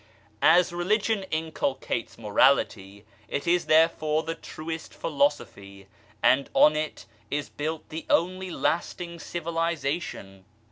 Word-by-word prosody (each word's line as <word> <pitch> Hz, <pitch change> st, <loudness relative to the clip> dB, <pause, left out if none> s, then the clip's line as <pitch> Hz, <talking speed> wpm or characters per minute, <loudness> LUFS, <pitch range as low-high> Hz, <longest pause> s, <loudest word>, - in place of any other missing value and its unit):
As 175 Hz, +2 st, +5 dB
Religion 200 Hz, +3 st, 0 dB
inculcates 155 Hz, -6 st, -2 dB
morality, 105 Hz, -3 st, +1 dB, 0.2 s
it 140 Hz, -, -3 dB
is 175 Hz, +1 st, +2 dB
therefore 155 Hz, -1 st, +3 dB
the 165 Hz, +1 st, -3 dB
truest 160 Hz, 0 st, -7 dB
philosophy, 100 Hz, -10 st, -2 dB, 0.4 s
and 135 Hz, +2 st, +4 dB
on 150 Hz, 0 st, +6 dB
it 155 Hz, 0 st, -3 dB, 0.2 s
is 145 Hz, -5 st, -2 dB
built 155 Hz, +7 st, -4 dB
the 160 Hz, 0 st, -7 dB
only 185 Hz, +2 st, +1 dB
lasting 170 Hz, 0 st, -2 dB
civilization. 165 Hz, -, -3 dB
155 Hz, 105 wpm, -26 LUFS, 140-170 Hz, 0.4 s, on